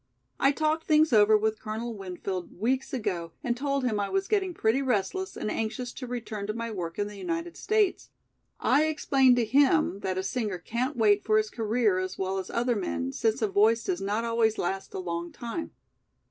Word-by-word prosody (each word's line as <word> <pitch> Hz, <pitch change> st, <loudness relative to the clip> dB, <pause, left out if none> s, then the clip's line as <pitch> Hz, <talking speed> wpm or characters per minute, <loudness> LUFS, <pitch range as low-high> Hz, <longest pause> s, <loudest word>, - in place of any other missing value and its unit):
I 275 Hz, -, +5 dB
talked 310 Hz, +2 st, 0 dB
things 310 Hz, -3 st, +4 dB
over 215 Hz, 0 st, +6 dB
with 220 Hz, 0 st, -1 dB
Colonel 225 Hz, +2 st, -4 dB
Winfield 185 Hz, -2 st, -5 dB
weeks 255 Hz, +5 st, 0 dB
ago 175 Hz, -9 st, -3 dB
and 240 Hz, -1 st, 0 dB
told 275 Hz, +1 st, -1 dB
him 220 Hz, -5 st, 0 dB
I 200 Hz, -, -1 dB
was 390 Hz, 0 st, 0 dB
getting 395 Hz, -3 st, +1 dB
pretty 260 Hz, -5 st, +1 dB
restless 265 Hz, -, -1 dB
and 215 Hz, -, -2 dB
anxious 225 Hz, +3 st, -3 dB
to 255 Hz, -, -7 dB
return 225 Hz, -4 st, -5 dB
to 215 Hz, -, -3 dB
my 230 Hz, 0 st, -4 dB
work 170 Hz, -5 st, -5 dB
in 205 Hz, -, 0 dB
the 205 Hz, -1 st, -9 dB
United 335 Hz, -, -3 dB
States. 430 Hz, -3 st, +1 dB, 0.5 s
I 285 Hz, +5 st, +3 dB
explained 270 Hz, -4 st, +3 dB
to 240 Hz, -2 st, +2 dB
him 280 Hz, -, +3 dB
that 185 Hz, -2 st, -2 dB
a 190 Hz, -, -1 dB
singer 210 Hz, -2 st, -2 dB
can't 245 Hz, -, -3 dB
wait 210 Hz, -2 st, +4 dB
for 215 Hz, 0 st, +3 dB
his 215 Hz, 0 st, 0 dB
career 220 Hz, -3 st, +1 dB
as 185 Hz, 0 st, -4 dB
well 190 Hz, 0 st, -1 dB
as 185 Hz, -, -6 dB
other 240 Hz, +1 st, 0 dB
men, 85 Hz, -, -2 dB
since 225 Hz, -, 0 dB
a -, -, +3 dB
voice 220 Hz, +4 st, +3 dB
does 370 Hz, -2 st, -2 dB
not 210 Hz, +4 st, -1 dB
always 230 Hz, -1 st, +2 dB
last 190 Hz, +2 st, -3 dB
a -, -, -2 dB
long 170 Hz, -1 st, -4 dB
time. 240 Hz, +8 st, -5 dB
225 Hz, 200 wpm, -28 LUFS, 200-265 Hz, 0.5 s, over